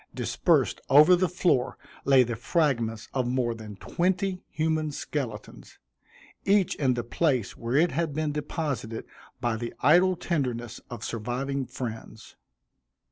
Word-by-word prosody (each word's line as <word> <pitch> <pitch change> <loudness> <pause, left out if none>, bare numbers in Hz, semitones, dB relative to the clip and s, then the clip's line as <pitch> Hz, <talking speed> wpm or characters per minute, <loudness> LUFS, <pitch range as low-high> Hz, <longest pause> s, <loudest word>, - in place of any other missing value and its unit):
Dispersed - - +1
over 150 +6 +8
the 180 0 +1
floor 170 -7 +1 0.3
lay 135 -2 +6
the 120 -1 -3
fragments 115 -5 0
of 130 -2 0
more 125 -2 0
than 110 -2 -9
twenty 185 - -1
human 155 -1 0
skeletons, 125 -7 -6 0.7
each 195 -2 +3
in 130 -4 +1
the 120 - -2
place 130 -2 0
where 115 +2 -3
it 165 +4 +4
had 160 +2 -1
been 155 -1 0
deposited 145 -6 -3 0.3
by 120 -2 0
the 120 +1 -5
idle 185 +1 +5
tenderness 125 -9 -3
of 120 -2 -7
surviving 125 +4 -3
friends. 115 -3 -7
135 Hz, 135 wpm, -27 LUFS, 120-160 Hz, 0.7 s, over